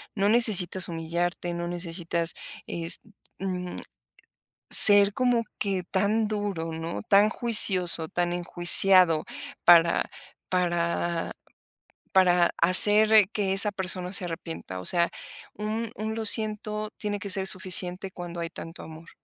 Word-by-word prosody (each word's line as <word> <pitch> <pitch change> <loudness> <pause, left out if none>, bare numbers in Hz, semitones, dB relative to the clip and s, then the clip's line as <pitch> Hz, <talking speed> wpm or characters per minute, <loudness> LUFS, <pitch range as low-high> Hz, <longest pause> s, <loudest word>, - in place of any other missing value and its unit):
No 200 -1 -1
necesitas 200 -6 +2
humillarte, 170 +1 -5
no 170 0 -6
necesitas 170 -1 -4 0.3
es, 170 0 -4 0.4
mm, 180 -2 -6 1.0
ser 205 -1 +5
como 245 -1 -1 0.2
que 195 -3 -3
tan 210 +3 -1
duro, 205 -6 -5
¿no?, 165 +1 -7
tan 205 +1 +3
juicioso, 190 -8 +3
tan 175 0 -3
enjuiciado 175 -1 +4 0.4
para 170 -1 +3 0.4
para 170 -1 -3 0.8
para 180 -2 +2
hacer 210 +3 +7
que 200 -3 -3
esa 200 +2 +3
persona 185 -1 -4
se 195 - -1
arrepienta. 165 - -9
O - - -13
sea, 170 -1 +2 0.5
un 215 +2 -5
un: 220 +1 -6
"Lo 225 -1 -6
siento", 215 -1 -1
tiene 205 -1 -5
que 205 -1 -8
ser 190 0 -1
suficiente, 185 0 -2
cuando 175 -1 -9
hay 165 - -6
tanto 165 0 -11
amor. 160 +1 -14
185 Hz, 125 wpm, -24 LUFS, 170-205 Hz, 1.0 s, hacer